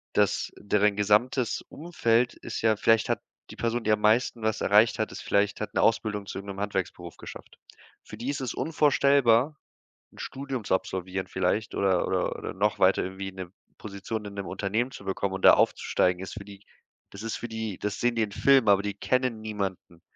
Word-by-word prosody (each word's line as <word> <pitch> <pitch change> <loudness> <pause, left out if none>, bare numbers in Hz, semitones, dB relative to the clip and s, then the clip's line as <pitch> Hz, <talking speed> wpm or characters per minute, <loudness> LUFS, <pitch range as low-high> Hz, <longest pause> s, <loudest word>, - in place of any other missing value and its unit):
dass - - +1
deren 105 0 +1
gesamtes 110 +4 +2
Umfeld 125 -7 0
ist - - -7
ja 110 -1 +3
vielleicht 115 +1 +3
hat - - 0 0.3
die - - -10
Person, 115 0 -2
die 110 - +1
am 105 0 +2
meisten 115 +2 +2
was 110 0 -1
erreicht 105 +3 +4
hat, 110 - -1
ist - - -8
vielleicht 100 +1 0
hat 105 - -4
'ne - - +1
Ausbildung 105 -2 +1
zu 100 - -7
irgendeinem 100 0 -8
Handwerksberuf 95 -4 -4
geschafft. - - -11 0.5
Für 105 - -11
die 120 +5 -4
ist 140 -1 -2
es 125 -3 -3
unvorstellbar, 140 -3 +3 0.6
'n - - -19
Studium 135 -4 -5
zu 95 - +1
absolvieren 95 0 -3
vielleicht, 95 +3 -1
oder 95 -3 +2
oder 95 -1 0
oder - - -6
noch 105 +2 0
weiter, 95 +1 +4
irgendwie 95 +1 -5
'ne 95 -2 -8 0.3
Position 105 +1 -6
in 100 0 -8
'nem 100 -1 -5
Unternehmen 100 +7 -2
zu 115 - -11
bekommen 95 0 -2
und 95 - -6
da - - +9
aufzusteigen, 90 0 +1
ist 95 - -7
für 105 - -8
die 100 0 -13 0.5
das 100 +2 -10
ist 115 - -3
für 120 - -6
die 110 -4 -5
das 105 0 -4
sehen 120 -1 +1
die 115 - +2
im 105 - -2
Filmen, 135 +1 +4
aber 100 -1 +5
die 105 -1 -3
kennen 115 +4 -1
niemanden. 95 -5 -5
105 Hz, 200 wpm, -27 LUFS, 95-115 Hz, 0.6 s, da